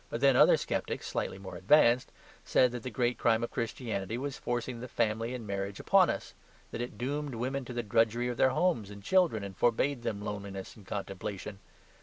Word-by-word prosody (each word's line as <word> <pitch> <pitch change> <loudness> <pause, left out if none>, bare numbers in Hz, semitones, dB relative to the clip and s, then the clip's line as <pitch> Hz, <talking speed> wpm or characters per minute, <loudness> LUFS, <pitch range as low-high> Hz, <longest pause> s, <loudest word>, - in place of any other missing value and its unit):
But, 115 - -3
then, 135 0 +5
other - - +7
sceptics - - -3
(slightly - - -3
more 95 -2 -9
advanced) 120 - +4 0.3
said 125 -1 +3
that 120 -1 -5
the 130 - -5
great 120 0 0
crime 115 0 +3
of 120 - -3
Christianity 115 -3 -3
was 140 +1 -3
forcing 120 0 -3
the 125 - -6
family 115 +1 -1
and 120 -3 -7
marriage 100 -1 -3
upon - - +5
us; - - -4 0.4
that - - -4
it 120 - -5
doomed 140 +1 -3
women 130 +3 -2
to 125 - -7
the 120 0 -2
drudgery 115 +3 +2
of 120 -1 -3
their 130 - +5
homes 130 - +1
and 100 -1 -10
children, 170 - +3
and 100 -1 -7
forbade 120 +5 +1
them 110 -3 -3
loneliness 100 -2 -6
and 100 -3 -16
contemplation. 95 0 -5
115 Hz, 200 wpm, -31 LUFS, 100-125 Hz, 0.4 s, other